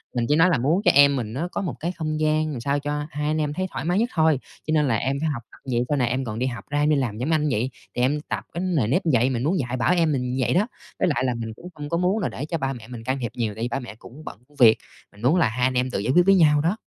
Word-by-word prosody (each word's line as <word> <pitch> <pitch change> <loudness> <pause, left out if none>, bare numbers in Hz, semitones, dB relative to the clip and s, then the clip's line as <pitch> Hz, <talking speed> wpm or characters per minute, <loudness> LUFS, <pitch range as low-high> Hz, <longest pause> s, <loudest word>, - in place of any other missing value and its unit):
mình 120 -1 +1
chỉ 150 - +4
nói 165 +4 +5
là 165 - +2
muốn 150 +10 +1
cho - - +7
em 140 0 +6
mình 115 -4 -4
nó 155 +8 -2
có - - -2
một 175 -7 -3
cái 170 +3 -2
không 155 -3 -3
gian 155 0 +1
làm 135 - -5
sao 140 +4 0
cho 145 +1 -3
hai 150 0 -3
anh 155 +1 0
em 150 -1 -1
thấy 185 +4 -2
thoải 135 +2 -5
mái 180 +4 +1
nhất 235 - +1
thôi, 160 -4 +3 0.3
cho - - -1
nên 150 -2 +3
là 115 - +2
em 135 +5 -1
phải 160 +1 0
học 125 -6 -4
tập - - -16
vậy 120 0 +1
sau 145 - +1
này 125 -3 +1
em 130 +2 -1
còn 110 -1 -4
đi 125 - 0
học 125 -2 -4
ra 145 - 0
em 150 +1 +2
đi 155 - +4
làm 125 -7 -1
giống 125 +6 -2
anh 150 -1 +2
vậy, 125 +1 0 0.3
thì 125 - 0
em 145 +4 +1
tập - - -2
cái 170 - -3
nề 160 - +1
nếp 140 - +2
vậy. 125 +2 +3
Mình 125 -2 -2
muốn 170 +6 +1
dạy 125 -2 -2
bảo 170 - +2
em 165 -3 +2
mình 125 -1 -1
vậy 125 - +1
đó, 200 +5 +2 0.3
với 185 - +2
lại 150 -6 0
là 125 - +1
mình 115 -1 -5
cũng 175 +11 -11
không 145 -1 -7
có 170 - 0
muốn 180 +5 +1
là 195 - -1
để 140 - -5
cho 165 +2 -2
ba 135 -3 -2
mẹ 115 -3 -10
mình 120 -2 -8
can 130 +3 -1
thiệp 120 -3 -3
nhiều 115 -3 -2
tại 110 - -5
vì - - 0
ba 125 +3 -2
mẹ 120 -5 -9
cũng 130 +7 -13
bận 95 - -8
công 145 - -25
việc, 115 -4 +7 0.3
mình 100 - -17
muốn 130 +8 +3
là 165 -11 +3
hai 125 +3 -3
anh 130 - -2
em 125 0 0
tự - - -1
giải 115 +6 0
quyết 175 0 +6
với 195 0 +6
nhau 150 -5 +5
đó. 175 +7 0
140 Hz, 350 wpm, -24 LUFS, 125-155 Hz, 0.3 s, cho